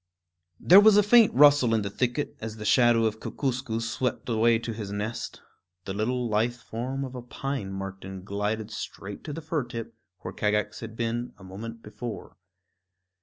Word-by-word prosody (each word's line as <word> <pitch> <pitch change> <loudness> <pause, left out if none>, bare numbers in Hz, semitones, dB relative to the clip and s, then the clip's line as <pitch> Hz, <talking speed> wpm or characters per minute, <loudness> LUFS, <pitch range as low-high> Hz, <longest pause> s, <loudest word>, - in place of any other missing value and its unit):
There 185 +3 +8
was 205 0 +7
a 210 - +6
faint 225 +2 +6
rustle 140 -4 +6
in 110 - +1
the 100 - -3
thicket 125 +6 -1
as 110 -1 -5
the 105 -1 -7
shadow 120 0 +4
of 110 0 -1
Kookooskoos 125 -4 -2
swept 125 +2 -2
away 115 0 +4
to 115 0 -5
his 105 -2 -6
nest. 105 +3 -4 0.4
The 95 - -4
long 120 +4 -1
lithe 115 +3 +1
form 125 +4 -4
of 130 - -8
a 125 - -6
pine 125 -4 -4
marten 95 -1 -7
glided 105 +2 -3
straight 100 -2 -7
to 150 - -4
the 165 - -5
fir 155 -2 -1
tip, 115 -1 -7 0.3
where 95 - -6
Kagax 105 +1 0
had 115 -1 -8
been 120 +1 -2
a 95 - -15
moment 115 +5 -8
before. 110 +1 -7
115 Hz, 175 wpm, -27 LUFS, 105-125 Hz, 0.4 s, There